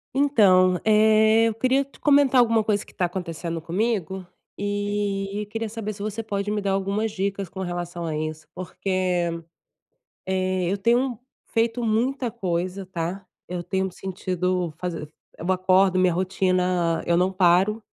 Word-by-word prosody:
Então, 190 -10 +4
eh, 220 +1 +5
eu 225 - 0
queria 255 +5 +2
te 275 - -21
comentar 280 -3 +4
alguma 230 -2 +4
coisa, 205 -1 0
que - - -17
está 180 - -1
acontecendo 170 -2 -4
comigo. 190 +1 -2 0.3
E 205 0 -2
queria 225 -1 -3
saber, 215 -1 -5
se 200 - -11
você 215 +2 -3
pode 205 -1 -3
me 210 0 -1
dar 200 -1 0
algumas 200 +3 -1
dicas 195 -1 -2
com 190 - -9
relação 175 -1 -4
a 160 -2 -2
isso, 155 0 -5
porque, 185 -1 -1 1.0
eh, 185 -1 0
eu 200 - 0
tenho 240 +3 +1 0.3
feito 230 +1 0
muita 240 +3 0
coisa, 185 -2 -3
tá, 180 +1 -4 0.2
eu 180 -1 -3
tenho 190 +2 -1
me 190 - -4
sentido 180 -2 -2
faz 180 -1 -3
eu 160 +3 -6
acordo, 185 0 +3
minha 185 -1 +3
rotina, 180 -2 +1
eu 170 0 +2
não 180 +2 +2
paro, 190 +4 +3
195 Hz, 155 wpm, -24 LUFS, 180-215 Hz, 1.0 s, eh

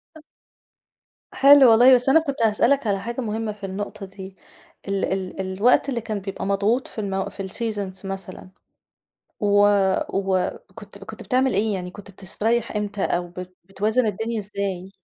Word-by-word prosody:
أ 315 - -13 1.1
حلو 275 -3 +7
والله، 250 +3 +7
بس 250 +2 +2
أنا 320 - +6
كنت 280 -6 -4
هاسألك 230 +4 +2
على 195 -1 +1
حاجة 235 +5 -4
مهمة 220 -1 -3
في 205 -1 -9
النقطة 195 +1 -6
دي، 190 0 -11 0.5
ال 195 0 -1
ال 190 0 -3
الوقت 200 +9 +2
اللي 240 -3 -2
كان 215 -2 -4
بيبقى 195 0 -6
مضغوط 205 +6 0
في 220 - -6
المو 195 -1 -2
في 195 0 -7
الseasons 200 -3 -3
مثلًا 190 -1 -7 0.9
و 205 0 +4 0.4
وكنت 195 +2 -3
كنت 215 +3 -10
بتعمل 255 +5 +1
إيه؟ 210 +1 +1
يعني 180 -1 -5
كنت 200 +1 -12
بتسترّيح 220 +5 -1
إمتى 205 -1 -3
أو 175 0 -1
بت 180 +1 -9
بتوازن 215 +6 0
الدنيا 225 +3 -2
ازاي؟ 195 -2 -4
205 Hz, 155 wpm, -23 LUFS, 195-230 Hz, 1.1 s, حلو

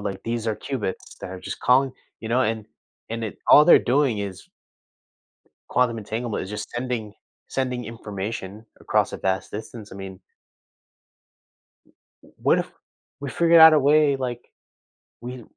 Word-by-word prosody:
like, 100 -2 -5
these 115 0 -3
are 110 - 0
cubits 115 -9 -5
that - - -7
are 95 -1 -8
just - - -7
calling 130 +1 +3 0.3
you 110 - -6
know, 125 +2 +3
and 110 -2 -1 0.5
and 115 0 -3
it 110 - -6
all 150 - +9
they're - - +9
doing 130 -3 +1
is 100 -3 -6 1.2
quantum 120 -2 +1
entanglement. 110 +2 -4
It's 95 - -7
just 105 0 -6
sending 120 -4 -4 0.3
sending 125 -2 -2
information 105 -1 -6 0.2
across - - +1
a - - -5
vast 95 0 -1
distance, 110 0 -8
I - - -8
mean 95 -1 -9 2.0
W - - -20
What - - +4
if - - -3 0.5
we 140 - -5
figured 170 -1 +5
out 160 0 +11
a 155 - +6
way, 145 0 +4
like, 125 -2 -5 0.7
we 125 -1 -7
115 Hz, 155 wpm, -24 LUFS, 105-130 Hz, 2.0 s, out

